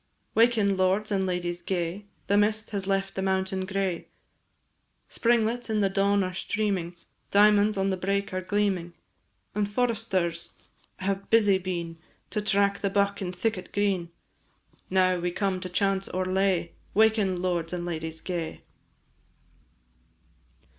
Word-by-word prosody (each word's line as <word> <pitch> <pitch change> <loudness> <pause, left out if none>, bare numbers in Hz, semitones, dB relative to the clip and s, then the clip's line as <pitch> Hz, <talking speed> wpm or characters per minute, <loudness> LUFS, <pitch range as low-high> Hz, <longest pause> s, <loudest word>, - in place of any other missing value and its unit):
Waken, 220 -4 +3
lords 190 +3 +1
and 190 -1 +1
ladies 175 -1 -2
gay, 180 +2 -3 0.2
The 200 - +2
mist 215 +2 +2
has 195 -2 -3
left 195 0 0
the 190 - -3
mountain 190 0 0
gray, 190 -3 -2 1.0
Springlets 235 0 +1
in 215 -1 +1
the 195 -1 +2
dawn 200 0 +2
are 185 0 -3
steaming, 190 -3 -1 0.3
Diamonds 210 +1 +5
on 195 0 +1
the 190 - -1
brake 200 +1 -1
are 185 - -1
gleaming: 190 -3 0 0.6
And 205 0 -1
foresters 205 -8 -1 0.4
have 195 +1 -2
busy 205 -4 +5
been 170 -3 -4 0.3
To 210 - -1
track 200 -1 +2
the 200 - 0
buck 200 0 +1
in 180 -2 -2
thicket 185 0 -2
green; 195 -4 0 0.8
Now 185 -1 +3
we 175 +1 -1
come 190 +1 -1
to 185 - -6
chant 195 +1 0
our 185 0 0
lay, 185 -2 +1 0.2
"Waken, 215 -4 +3
lords 175 -2 -1
and 175 -1 -3
ladies 160 -1 -5
gay." 170 -3 -4
195 Hz, 140 wpm, -27 LUFS, 180-205 Hz, 1.0 s, Diamonds